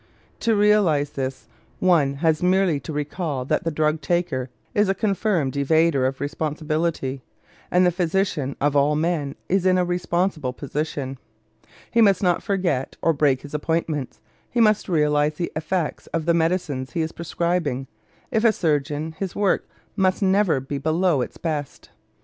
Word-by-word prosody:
To 225 -1 +2
realize 200 -9 +3
this, 135 -1 -4 0.3
one 155 -7 +3
has 160 -1 +3
merely 180 -4 +2
to 140 - -7
recall 150 -2 -3
that - - 0
the - - +2
drug 155 0 0
taker 150 -5 -1 0.2
is 205 -1 +2
a 195 - +2
confirmed 195 - 0
evader 140 -1 +2
of 130 0 -4
responsibility; 155 -1 -2 0.5
and 180 +1 +4
the 180 - +4
physician, 170 -5 -1
of 145 0 +1
all 145 +1 +3
men, 155 -3 -1
is 190 0 +1
in 185 0 +4
a 180 - +2
responsible 175 -5 -1
position. 140 -1 -4 0.7
He 230 - +4
must 200 -2 +4
not 175 -2 +2
forget 175 -10 -1
or 165 - +4
break 140 -3 +2
his 145 - -10
appointments; 150 -3 -2 0.3
he 240 - -1
must 215 -3 +3
realize 150 -2 +2
the 170 - -3
effects 160 +1 -2
of 165 -2 -3
the 170 - +3
medicines 160 -7 -1
he 165 - 0
is 160 0 -2
prescribing; 170 -5 -2 0.5
if 220 - +1
a 230 - +6
surgeon, 150 -3 -1
his 195 -2 -4
work 200 -2 +1 0.3
must 190 0 +1
never 190 -6 +3
be 135 +2 -5
below 160 0 +1
its - - -5
best. 150 -4 -4
160 Hz, 160 wpm, -23 LUFS, 145-180 Hz, 0.7 s, a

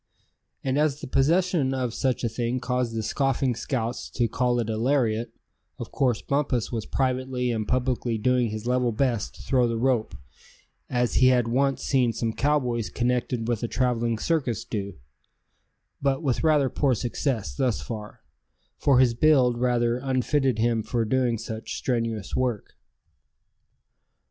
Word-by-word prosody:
And 135 +2 0
as 150 -2 +1
the - - -7
possession 155 0 +2
of 125 -3 -2
such 130 0 -1
a - - +2
thing 120 +2 -2
caused 125 -2 -1
the 110 - -2
scoffing 135 +2 0
scouts 120 -1 -3
to 120 - 0
call 125 +2 0
it 115 - -1
a 110 - -2
lariat, 115 -2 +1 0.5
of - - -7
course 125 -5 0
Bumpus 140 -5 0
was 115 -3 -3
privately 130 -1 -1
and 110 -2 -2
publicly 125 -2 0
doing 125 +1 +2
his 110 +1 -5
level 125 -1 +1
best 115 -2 -1
to - - -12
throw 125 -3 +2
the 115 -1 -2
rope, 120 - 0 0.7
as 125 -1 0
he 130 - +6
had 125 -2 +3
once 135 +3 +1
seen 125 -4 +2
some 115 -1 -2
cowboys 125 -6 0
connected 120 -1 -1
with 120 -3 -1
a 120 - -1
traveling 120 -2 0
circus 130 - -1
do; 100 -2 -4 1.1
but 135 +2 0
with 135 -1 0
rather 150 -4 +4
poor 130 0 +1
success 115 - -2
thus 120 - 0
far, 105 -2 -7 0.6
for 140 -3 +4
his 125 -2 +4
build 125 -2 +3
rather 120 -1 +1
unfitted 130 0 0
him 115 0 +1
for 115 +1 -1
doing 125 0 +1
such 110 0 -6
strenuous 115 -4 -2
work. 125 -5 -2
125 Hz, 155 wpm, -25 LUFS, 115-130 Hz, 1.1 s, he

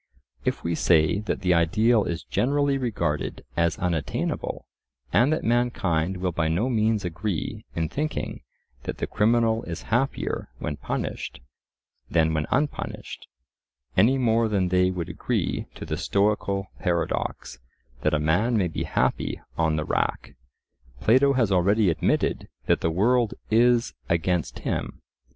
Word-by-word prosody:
If - - -1
we 85 - -1
say 80 +2 +3
that 105 -1 -3
the 90 -2 +3
ideal 105 +6 +3
is 85 -2 -3
generally 140 +2 +1
regarded 105 - -2
as 85 -1 +1
unattainable, 85 -6 -2 0.5
and 130 +5 +4
that 155 - 0
mankind 95 -8 +1
will 90 0 -1
by 80 -1 0
no 90 +11 +1
means 110 -3 +1
agree 90 +1 -3
in 80 -1 0
thinking 150 - -3 0.4
that - - -4
the - - -2
criminal 115 +1 +2
is 85 -1 -6
happier 135 +3 0
when 75 - -4
punished - - -4 0.7
than 80 -1 +2
when 80 -1 -1
unpunished, 145 +2 -2 0.7
any 115 +8 +5
more 115 -2 +2
than 100 -4 +1
they 90 0 +3
would 90 -3 -3
agree - - -2
to - - -7
the - - -3
stoical 100 -1 0
paradox 85 -6 -2 0.4
that - - +2
a - - +1
man 95 +11 +2
may 95 -4 +2
be - - -3
happy - - 0 0.2
on 80 -1 +1
the 75 0 -1
rack, - - -1 0.7
Plato 130 - +4
has 120 -6 +2
already 100 +2 +3
admitted 80 - 0 0.2
that - - +2
the 80 - +1
world 115 +6 +2 0.2
is 120 +1 +4 0.2
against 85 0 0
him. - - -3
100 Hz, 140 wpm, -25 LUFS, 85-115 Hz, 0.7 s, any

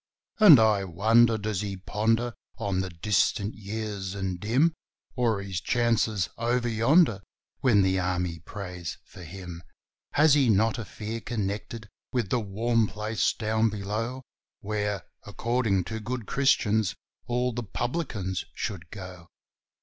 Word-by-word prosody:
And 180 - +10
I 110 -3 +4
wonder 110 +6 +4
does 105 -2 -2
he 100 -2 -4
ponder 115 +5 0 0.2
on 95 -2 -1
the 95 - -4
distant 100 +4 0
years 100 -2 -5
and 95 -2 -3
dim, 130 - +2 0.4
Or 115 -6 +1
his 95 -3 -4
chances 115 -5 +1
over 120 +1 +1
yonder, 115 - +3 0.4
when 105 -7 +4
the 95 0 +2
Army 90 -2 -1
prays 90 -1 -7
for - - -13
him? 90 0 -8 0.5
Has 150 0 +5
he 140 -5 +4
not 110 +4 +3
a 115 - -4
fear 110 +3 -5
connected 110 0 -4 0.2
with 120 -6 -1
the 125 - +2
warm 115 +2 +1
place 105 +1 0
down 110 0 +1
below, 110 +5 -4 0.4
Where, 105 -1 -2 0.2
according 115 -5 0
to 110 +5 -5
good 120 +1 -4
Christians, 110 -7 +2 0.3
all 125 0 0
the 120 - -3
publicans 110 - -3
should 95 -9 -5
go? 90 -3 -9
110 Hz, 135 wpm, -27 LUFS, 95-120 Hz, 0.5 s, And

